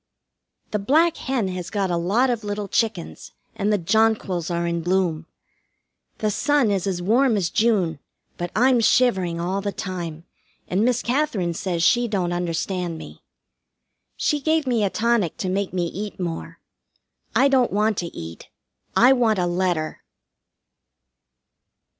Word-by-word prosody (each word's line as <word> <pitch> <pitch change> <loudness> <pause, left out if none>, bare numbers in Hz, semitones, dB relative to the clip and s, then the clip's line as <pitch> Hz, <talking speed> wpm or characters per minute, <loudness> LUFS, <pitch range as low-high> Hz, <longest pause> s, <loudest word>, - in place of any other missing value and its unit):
The 210 - 0
black 310 +11 +3
hen 255 -7 -2
has 180 -2 -5
got 195 -4 -1
a - - +1
lot 205 +10 +2
of 230 -2 -3
little 205 0 -3
chickens 80 - -2 0.2
and 205 +2 0
the 210 - +3
jonquils 195 -2 +1
are 170 0 -1
in 170 0 -1
bloom. 175 -2 0 0.9
The 215 -1 0
sun 280 -1 +2
is 195 -1 -1
as 180 -2 -2
warm 235 +4 +3
as 180 -4 -1
June, 195 -9 +1 0.4
but 175 0 -4
I'm 250 +2 +4
shivering 190 -8 +2
all 185 +3 -1
the 200 0 -2
time, 175 -6 -6 0.4
and 190 +4 +1
Miss 245 0 +1
Katherine 240 - 0
says 170 0 -2
she 240 +6 +4
don't 185 -5 -1
understand 175 0 -2
me. - - -11 1.0
She 295 - +1
gave 315 +1 +1
me 240 -4 +1
a 200 - +2
tonic 225 -5 0
to 185 - -2
make 195 +1 -1
me 180 -2 -1
eat 200 +4 -6
more. 165 -1 -5 0.8
I 275 - +5
don't 260 -3 +3
want 210 +1 +1
to 175 - -3
eat. 85 - -9 0.5
I 250 +3 +6
want 230 -5 +2
a 180 - +1
letter. 175 -3 -1
195 Hz, 155 wpm, -23 LUFS, 175-230 Hz, 1.0 s, I